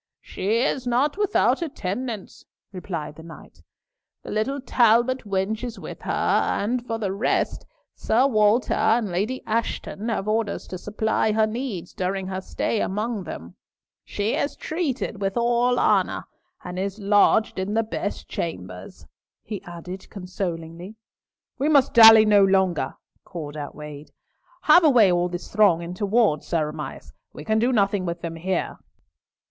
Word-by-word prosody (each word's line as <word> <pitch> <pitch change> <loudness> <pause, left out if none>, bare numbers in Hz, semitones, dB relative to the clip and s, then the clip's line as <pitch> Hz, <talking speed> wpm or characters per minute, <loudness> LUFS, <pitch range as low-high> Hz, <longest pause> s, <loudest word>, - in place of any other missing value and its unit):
"She 220 +5 -1
is 260 -2 -1
not 260 +5 +1
without 415 -2 +2
attendance," 235 - -5 0.3
replied 170 -5 -6
the - - -10
knight, 165 0 -13 0.6
"the - - -8
little 265 +7 -1
Talbot 240 0 +2
wench 200 +3 -1
is 240 -2 -5
with - - -9
her, - - -4
and 235 +4 0
for 225 - -2
the 205 -4 -2
rest, 200 +5 -1 0.3
Sir 240 +4 +2
Walter 215 -2 +3
and 220 -1 +2
Lady 210 +9 -2
Ashton 225 -1 -3
have 215 -3 -2
orders 215 -1 -1
to 185 - -6
supply 220 +2 0
her 220 0 +3
needs 215 -6 -5
during 190 +1 -2
her 190 0 -4
stay 210 +3 -2
among 210 0 -2
them. 85 - -8 0.5
She 210 +3 -2
is 285 - -1
treated 275 - -3
with 195 +1 -1
all 240 +1 +2
honour, - - +1 0.4
and 180 0 -6
is 195 +1 -3
lodged 205 0 +3
in 195 +3 -2
the 225 - +2
best 210 -2 -5
chambers," 90 - -6 0.4
he 205 -3 -6
added, 180 +2 -9
consolingly. 180 0 -6 0.6
"We 285 +3 +1
must 280 -3 +4
dally 225 -2 +9
no 205 -2 +5
longer," 190 -7 +1 0.3
called 155 -5 -7
out 145 -1 -6
Wade. 150 0 -9 0.5
"Have 355 - +6
away 240 - +6
all 175 0 +1
this 175 0 -7
throng 200 -5 +4
into 180 +4 -4
ward, 210 -8 +2
Sir 155 -3 -1
Amias. 150 - -8 0.2
We - - -9
can 220 0 +1
do 240 +3 +2
nothing 200 -4 +1
with 170 0 -4
them 165 -1 -5
here." 185 +2 -2
205 Hz, 150 wpm, -24 LUFS, 180-230 Hz, 0.6 s, dally